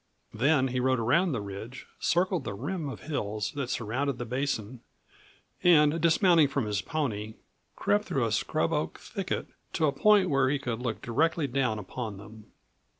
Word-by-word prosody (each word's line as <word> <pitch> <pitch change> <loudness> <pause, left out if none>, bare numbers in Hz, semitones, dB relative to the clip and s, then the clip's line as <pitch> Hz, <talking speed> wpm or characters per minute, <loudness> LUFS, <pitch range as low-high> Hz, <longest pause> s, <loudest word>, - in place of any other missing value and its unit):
Then 135 +3 +2
he 125 0 -1
rode 130 +1 +2
around 145 +11 +2
the 125 -6 -2
ridge, 100 +6 -8
circled 180 -2 +1
the 100 - -4
rim 160 - -3
of - - -8
hills 105 -8 -3
that 140 -4 -3
surrounded 125 +5 -1
the 120 - -4
basin, 125 -2 -3 0.8
and 160 -2 +5
dismounting 170 -1 +5
from 135 -3 -1
his 105 -2 -1
pony, 110 -4 -3 0.4
crept 105 0 +1
through 130 -4 0
a 115 - -1
scrub 155 +9 0
oak 150 0 -2
thicket 195 -4 -4 0.3
to 160 - +2
a 145 - +3
point 200 +6 +4
where 135 -1 +3
he 145 - +1
could 120 -4 -4
look 120 -3 -4
directly 160 +6 +1
down 125 -4 0
upon 105 +1 -6
them. 105 +2 -13
130 Hz, 170 wpm, -28 LUFS, 110-155 Hz, 0.8 s, and